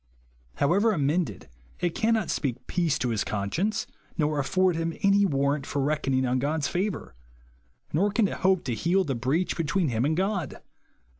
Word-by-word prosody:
However 200 Hz, +9 st, +3 dB
amended, 145 Hz, -, -1 dB, 0.3 s
it 175 Hz, -2 st, 0 dB
cannot 220 Hz, -4 st, +1 dB
speak 130 Hz, -3 st, -2 dB
peace 170 Hz, -5 st, 0 dB
to 125 Hz, -, -1 dB
his 110 Hz, -3 st, 0 dB
conscience, 165 Hz, -, -1 dB, 0.3 s
nor 150 Hz, -2 st, +1 dB
afford 185 Hz, +5 st, +2 dB
him 165 Hz, 0 st, -2 dB
any 200 Hz, 0 st, +5 dB
war 140 Hz, -3 st, +1 dB
rant 145 Hz, -3 st, -5 dB
for 145 Hz, -, -2 dB
reckoning 135 Hz, -2 st, +1 dB
on 125 Hz, +1 st, +1 dB
God's 145 Hz, +1 st, 0 dB
favour; 185 Hz, -, -2 dB, 0.8 s
nor 190 Hz, +7 st, +3 dB
can 205 Hz, 0 st, +2 dB
it -, -, -5 dB
help 190 Hz, -2 st, +3 dB
to 125 Hz, -, -2 dB
heal 175 Hz, +10 st, +2 dB
the 145 Hz, -6 st, -2 dB
breach 130 Hz, +9 st, 0 dB
between 165 Hz, 0 st, 0 dB
him 115 Hz, -1 st, 0 dB
aud 155 Hz, +3 st, +1 dB
God. 190 Hz, -, -2 dB
160 Hz, 170 wpm, -27 LUFS, 135-190 Hz, 0.8 s, any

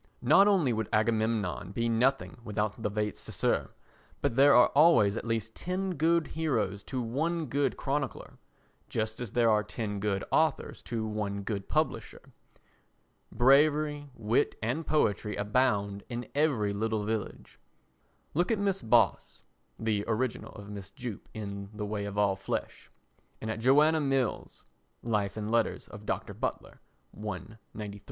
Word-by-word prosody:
Not 200 Hz, -, +6 dB
only 175 Hz, -, +3 dB
would 110 Hz, -2 st, -2 dB
Agamemnon 110 Hz, -4 st, 0 dB
be 115 Hz, +2 st, 0 dB
nothing 125 Hz, +5 st, +1 dB
without 105 Hz, 0 st, -2 dB
the 105 Hz, -, 0 dB
vates 105 Hz, 0 st, -2 dB
sacer -, -, -1 dB, 0.5 s
but 140 Hz, -5 st, -1 dB
there 140 Hz, +2 st, +7 dB
are 125 Hz, -, +7 dB
always 140 Hz, -10 st, +5 dB
at -, -, -4 dB
least 115 Hz, -1 st, -2 dB
ten 185 Hz, +1 st, -2 dB
good 165 Hz, +1 st, +2 dB
heroes 110 Hz, -11 st, -1 dB
to 130 Hz, -, -3 dB
one 160 Hz, +8 st, -1 dB
good 140 Hz, +1 st, 0 dB
chronicler, 140 Hz, -1 st, -3 dB, 0.5 s
just 110 Hz, 0 st, -2 dB
as 120 Hz, -5 st, -6 dB
there 120 Hz, -2 st, +4 dB
are 105 Hz, 0 st, +4 dB
ten 105 Hz, -1 st, -4 dB
good 100 Hz, -1 st, -1 dB
authors 155 Hz, -3 st, +1 dB
to 115 Hz, -2 st, -2 dB
one 105 Hz, -2 st, -3 dB
good 100 Hz, -1 st, -4 dB
publisher. -, -, -2 dB, 1.0 s
Bravery, 145 Hz, +2 st, +3 dB
wit 115 Hz, +1 st, +1 dB
and 130 Hz, +9 st, -2 dB
poetry 105 Hz, -8 st, +1 dB
abound 100 Hz, -2 st, +1 dB
in 120 Hz, 0 st, -5 dB
every 135 Hz, -9 st, +1 dB
village. 110 Hz, 0 st, -3 dB, 0.7 s
Look 175 Hz, +4 st, +1 dB
at 225 Hz, -, +2 dB
Mrs. 195 Hz, -, -1 dB
Boss 115 Hz, -7 st, +2 dB, 0.3 s
[the 110 Hz, -2 st, 0 dB
original 115 Hz, +2 st, -2 dB
of 105 Hz, -2 st, -10 dB
Mrs. 100 Hz, -2 st, -9 dB
Jupp 125 Hz, -6 st, -7 dB
in 100 Hz, -2 st, -6 dB
The 105 Hz, 0 st, -3 dB
Way 105 Hz, 0 st, -3 dB
of 100 Hz, 0 st, -6 dB
All 100 Hz, -2 st, +3 dB
Flesh] 95 Hz, -, -5 dB, 0.5 s
and 110 Hz, -, -3 dB
at 110 Hz, -, -4 dB
Joanna 150 Hz, +6 st, +4 dB
Mills 135 Hz, -4 st, -1 dB, 0.4 s
[Life 105 Hz, -3 st, -1 dB
and 105 Hz, 0 st, -3 dB
Letters 115 Hz, -1 st, 0 dB
of 105 Hz, 0 st, -11 dB
Dr. -, -, -2 dB
Butler, -, -, -5 dB, 0.4 s
I, 105 Hz, +1 st, -6 dB, 0.2 s
93]. 105 Hz, -1 st, -6 dB
115 Hz, 145 wpm, -30 LUFS, 105-140 Hz, 1.0 s, there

